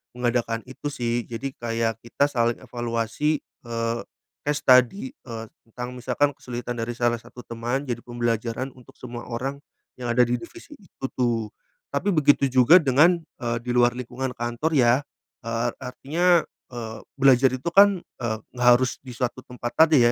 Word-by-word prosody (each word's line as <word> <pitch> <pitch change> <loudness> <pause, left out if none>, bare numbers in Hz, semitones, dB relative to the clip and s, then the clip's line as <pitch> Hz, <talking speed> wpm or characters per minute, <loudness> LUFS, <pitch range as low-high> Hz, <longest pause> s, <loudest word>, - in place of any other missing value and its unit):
mengadakan 120 -2 0
itu 135 +2 -6
sih, 120 -2 -1
jadi 120 +4 -4
kayak 115 -1 -1
kita 120 +4 +1
saling 120 -3 +1
evaluasi, 120 +4 -1
eee, 115 0 -4 0.5
case 145 0 0
study, 130 - +4
eee, 115 - -8 0.2
tentang 125 +2 -6
misalkan 130 +4 +1
kesulitan 120 0 -5
dari 115 +1 -2
salah 120 -1 +1
satu 125 - -12
teman, 120 +3 -2
jadi 120 -3 -2
pembelajaran 120 +1 -2
untuk 125 - -16
semua 120 -1 -8
orang 130 +4 -3 0.4
yang 120 -1 -2
ada 125 - +4
di 120 +1 0
divisi 335 - -12
itu 180 -8 -9
tuh. 115 -4 0 0.4
Tapi 205 - 0
begitu 145 -3 +4
juga 130 +7 +7
dengan, 150 +5 +5 0.2
eee, 115 -1 -1
di 125 - -1
luar 120 0 +4
lingkungan 125 +1 -4
kantor 120 +7 -1
ya, 125 +1 +4 0.4
eee, 115 +1 0
artinya, 160 +7 +2 0.2
eee, 115 -3 -6 0.2
belajar 135 -1 +6
itu 130 +6 -2
kan, 200 -1 +7
eee, 115 -2 -4 0.2
nggak 125 -1 0
harus 130 0 -2
di 130 -1 -10
suatu 125 0 -2
tempat 120 -1 -5
tadi 155 -7 +6
125 Hz, 160 wpm, -24 LUFS, 120-135 Hz, 0.5 s, juga